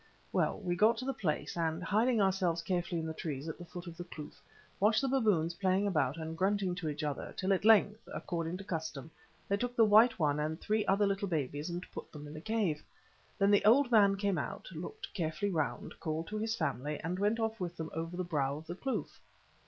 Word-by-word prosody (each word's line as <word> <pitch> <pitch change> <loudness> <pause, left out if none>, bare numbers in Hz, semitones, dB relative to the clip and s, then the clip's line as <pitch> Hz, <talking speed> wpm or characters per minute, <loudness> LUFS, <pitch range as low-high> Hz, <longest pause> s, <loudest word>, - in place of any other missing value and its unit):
"Well, - - +2
we 175 -3 -1
got 220 +5 +4
to 255 - -4
the 270 - -1
place, 160 -11 -2
and, 165 0 -1
hiding 220 +6 +2
ourselves 185 -4 +2
carefully 175 -1 -1
in 160 - -3
the 160 - -3
trees 150 -2 -4
at 160 - -5
the 175 - -8
foot 175 +1 -8
of 170 -2 -9
the 175 - -5
kloof, 155 -4 -10 0.4
watched 215 +2 +4
the 270 - 0
baboons 210 -11 +2
playing 190 +2 +1
about 155 -7 +1
and 160 0 -5
grunting 190 +1 +1
to 175 -3 -3
each 150 +1 -4
other, 145 -2 -3
till 190 +1 +2
at 190 - 0
length, 215 0 +4
according 170 -1 -3
to 195 - -8
custom, 160 -5 -5 0.4
they 200 - +1
took 245 +3 -3
the 225 - +6
white 220 +3 +6
one 150 -3 +1
and 155 +2 -2
three 215 0 +1
other 200 +2 +4
little 200 0 0
babies 150 -2 -2
and 175 +1 -4
put - - -8
them 150 -1 -9
in 145 - -9
the 155 - -7
cave. 200 -7 0 0.6
Then 200 0 +4
the 205 - +5
old 250 +4 +5
man 200 -3 +6
came 200 -1 0
out, - - -5
looked 435 0 -7
carefully 170 +2 -1
round, 155 -5 -2
called 160 +1 -2
to 215 0 -3
his 220 +1 -1
family, 150 - -2
and 180 +4 -3
went 210 +3 +2
off 225 0 -1
with 175 -2 -4
them 160 -1 -5
over 165 +2 -4
the 185 - -1
brow 145 -5 -1
of 155 - -10
the 170 - -5
kloof. 265 +7 -4
180 Hz, 230 wpm, -33 LUFS, 160-210 Hz, 0.6 s, the